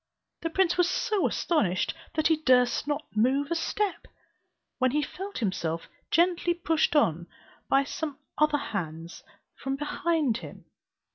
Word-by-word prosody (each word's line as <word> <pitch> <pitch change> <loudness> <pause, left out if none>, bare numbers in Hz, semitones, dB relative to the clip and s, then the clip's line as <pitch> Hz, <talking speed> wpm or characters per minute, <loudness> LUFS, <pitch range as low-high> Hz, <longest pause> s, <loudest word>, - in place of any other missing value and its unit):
The 330 - -1
prince 355 +1 +2
was 355 0 +4
so 415 -3 +1
astonished 200 - +1 0.2
that 310 - 0
he 320 -1 +4
durst 255 -2 +3
not 295 +1 -1
move 270 +7 +2
a - - +2
step; 405 +4 -2 0.7
when 255 -1 +4
he 295 +4 +1
felt 390 +6 -6
himself 170 -6 -2 0.2
gently 345 +1 +2
pushed 325 -2 +1
on 175 - +2 0.4
by 275 0 +4
some 290 0 -4 0.2
other 305 -1 +3
hands 165 - -5 0.3
from 270 0 -3
behind 295 -3 0
him. - - -10
295 Hz, 140 wpm, -28 LUFS, 240-335 Hz, 0.7 s, was